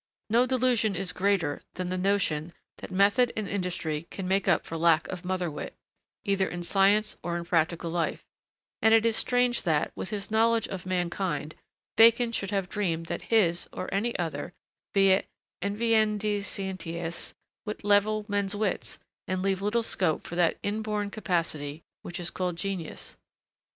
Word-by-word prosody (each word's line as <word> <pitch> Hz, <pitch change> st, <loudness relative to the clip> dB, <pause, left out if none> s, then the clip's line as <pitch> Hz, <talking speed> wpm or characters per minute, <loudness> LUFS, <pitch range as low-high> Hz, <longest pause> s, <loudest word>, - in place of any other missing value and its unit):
No 240 Hz, +3 st, +4 dB
delusion 245 Hz, -5 st, +2 dB
is 180 Hz, 0 st, -1 dB
greater 185 Hz, -7 st, +1 dB
than 185 Hz, -1 st, -3 dB
the 185 Hz, -, -1 dB
notion 180 Hz, -5 st, 0 dB, 0.2 s
that -, -, -8 dB
method 200 Hz, +6 st, +3 dB
and 215 Hz, -2 st, -2 dB
industry 170 Hz, -5 st, -2 dB
can 190 Hz, -2 st, -5 dB
make 195 Hz, +1 st, +1 dB
up -, -, +3 dB
for 165 Hz, -, -6 dB
lack 165 Hz, -1 st, +3 dB
of 185 Hz, -2 st, -5 dB
motherwit, 180 Hz, -4 st, -3 dB, 0.5 s
either 195 Hz, -1 st, +1 dB
in 175 Hz, 0 st, -5 dB
science 200 Hz, +4 st, +3 dB
or 170 Hz, 0 st, -2 dB
in 170 Hz, -, -5 dB
practical 170 Hz, 0 st, 0 dB
life; 170 Hz, -2 st, -2 dB, 0.6 s
and 220 Hz, 0 st, +6 dB
it 225 Hz, 0 st, +4 dB
is 230 Hz, -1 st, +3 dB
strange 245 Hz, 0 st, +2 dB
that, 155 Hz, -4 st, +1 dB
with -, -, -5 dB
his 210 Hz, -1 st, -4 dB
knowledge 225 Hz, 0 st, +3 dB
of 185 Hz, -1 st, -6 dB
mankind, 180 Hz, -3 st, -2 dB, 0.4 s
Bacon 230 Hz, +1 st, +6 dB
should 195 Hz, -4 st, -2 dB
have 195 Hz, -3 st, -1 dB
dreamed 170 Hz, -5 st, -1 dB
that -, -, -4 dB
his, 175 Hz, -7 st, +3 dB
or 185 Hz, -, -5 dB
any 225 Hz, +5 st, 0 dB
other, 165 Hz, 0 st, -3 dB, 0.4 s
'via 195 Hz, -1 st, +5 dB, 0.4 s
inveniendi 210 Hz, 0 st, +1 dB
scientias' 170 Hz, -4 st, -5 dB, 0.3 s
would 210 Hz, -, -5 dB
'level 205 Hz, +1 st, +3 dB
men's 200 Hz, -1 st, -1 dB
wits' 205 Hz, -2 st, -2 dB, 0.3 s
and 185 Hz, 0 st, -1 dB
leave 195 Hz, -1 st, 0 dB
little 220 Hz, +3 st, +1 dB
scope 180 Hz, -7 st, +1 dB
for 175 Hz, -, -6 dB
that 175 Hz, -2 st, +2 dB
inborn 210 Hz, 0 st, -2 dB
capacity 165 Hz, -7 st, -2 dB, 0.2 s
which 175 Hz, +1 st, -6 dB
is 170 Hz, -1 st, -3 dB
called 180 Hz, -2 st, -2 dB
genius. 185 Hz, -2 st, -5 dB
195 Hz, 160 wpm, -28 LUFS, 175-210 Hz, 0.6 s, and